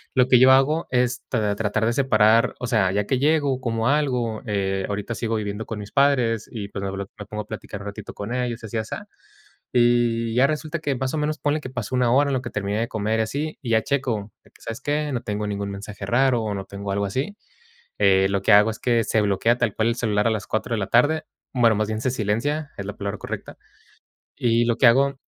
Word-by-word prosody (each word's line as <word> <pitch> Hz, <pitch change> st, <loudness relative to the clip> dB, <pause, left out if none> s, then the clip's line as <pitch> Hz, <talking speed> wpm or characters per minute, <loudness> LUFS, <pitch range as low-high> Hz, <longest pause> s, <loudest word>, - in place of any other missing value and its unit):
Lo 125 Hz, -1 st, +4 dB
que 125 Hz, -2 st, +6 dB
yo 130 Hz, +1 st, +7 dB
hago 140 Hz, +5 st, +3 dB
es 125 Hz, 0 st, +1 dB
tra 105 Hz, -4 st, 0 dB
tratar 110 Hz, +1 st, 0 dB
de 115 Hz, -, +1 dB
separar, 115 Hz, -2 st, +3 dB
o 125 Hz, -, -3 dB
sea, 105 Hz, -6 st, +2 dB
ya 100 Hz, +1 st, 0 dB
que 130 Hz, +4 st, 0 dB
llego, 145 Hz, -2 st, +2 dB
como 115 Hz, -2 st, -1 dB
algo, 125 Hz, -7 st, 0 dB
eh, 95 Hz, -2 st, -1 dB
ahorita 105 Hz, +3 st, -3 dB
sigo 115 Hz, -1 st, -2 dB
viviendo 105 Hz, 0 st, -3 dB
con 110 Hz, -, -5 dB
mis 105 Hz, 0 st, -8 dB
padres 125 Hz, -6 st, +2 dB
y 105 Hz, -4 st, -6 dB
pues, 100 Hz, -1 st, -6 dB
me 100 Hz, -, -2 dB
blo 100 Hz, 0 st, -5 dB
me 105 Hz, -, -6 dB
pongo 105 Hz, +1 st, -5 dB
a -, -, -25 dB
platicar 100 Hz, -1 st, -7 dB
un 105 Hz, -, -7 dB
ratito 100 Hz, -, -8 dB
con 105 Hz, +4 st, -5 dB
ellos 120 Hz, -2 st, -2 dB
y -, -, -5 dB
así 110 Hz, -, -4 dB
asá. 110 Hz, -, -5 dB, 0.7 s
Y 120 Hz, -2 st, +2 dB
ya 130 Hz, +2 st, +5 dB
resulta 155 Hz, +2 st, -3 dB
que 145 Hz, -3 st, -1 dB
más 130 Hz, +2 st, -2 dB
o -, -, 0 dB
menos, 150 Hz, +1 st, -1 dB
ponle 150 Hz, +1 st, 0 dB
que 130 Hz, -, -8 dB
pasó 125 Hz, -2 st, -5 dB
1 125 Hz, -2 st, +2 dB
hora, 140 Hz, +2 st, +4 dB
en 135 Hz, -, 0 dB
lo 130 Hz, -, -1 dB
que 120 Hz, -, -6 dB
terminé 100 Hz, 0 st, -2 dB
de 115 Hz, -, -1 dB
comer 110 Hz, +1 st, -1 dB
y -, -, +4 dB
así, 145 Hz, +8 st, -3 dB
y 120 Hz, -, -4 dB
ya 110 Hz, -1 st, +3 dB
checo, 115 Hz, -7 st, -2 dB
de -, -, -22 dB
que -, -, -23 dB
¿sabes 115 Hz, +2 st, -6 dB
qué? 145 Hz, +1 st, -1 dB
No 125 Hz, -2 st, -2 dB
tengo 105 Hz, -2 st, -3 dB
ningún 100 Hz, 0 st, -3 dB
mensaje 100 Hz, 0 st, -7 dB
raro 125 Hz, +1 st, +2 dB
o 105 Hz, -2 st, -2 dB
no 95 Hz, -1 st, -4 dB
tengo 100 Hz, 0 st, -5 dB
algo 100 Hz, +1 st, 0 dB
así. 135 Hz, -, -3 dB, 0.6 s
Eh, 95 Hz, 0 st, +4 dB
lo 100 Hz, 0 st, 0 dB
que -, -, +2 dB
hago 105 Hz, +2 st, +6 dB
es 110 Hz, -, -9 dB
que 120 Hz, -2 st, +2 dB
se 110 Hz, -, +1 dB
bloquea 105 Hz, +4 st, +2 dB
tal 105 Hz, -, 0 dB
cual 110 Hz, -, +1 dB
el 115 Hz, -, 0 dB
celular 105 Hz, -4 st, 0 dB
a -, -, +2 dB
las 110 Hz, -1 st, -3 dB
4 110 Hz, +2 st, -2 dB
de -, -, -2 dB
la 95 Hz, -, -2 dB
tarde, 145 Hz, +7 st, +3 dB, 0.3 s
bueno, 115 Hz, -4 st, +4 dB
más 105 Hz, 0 st, 0 dB
bien 110 Hz, 0 st, -3 dB
se 130 Hz, -, 0 dB
silencia, 130 Hz, +7 st, -1 dB
es 100 Hz, -, -5 dB
la 105 Hz, -, -5 dB
palabra 100 Hz, +1 st, -4 dB
correcta. -, -, -7 dB, 0.8 s
Y 115 Hz, 0 st, +2 dB
lo 115 Hz, -, +1 dB
que 130 Hz, -, +4 dB
hago 135 Hz, +3 st, +4 dB
115 Hz, 250 wpm, -23 LUFS, 105-130 Hz, 0.8 s, yo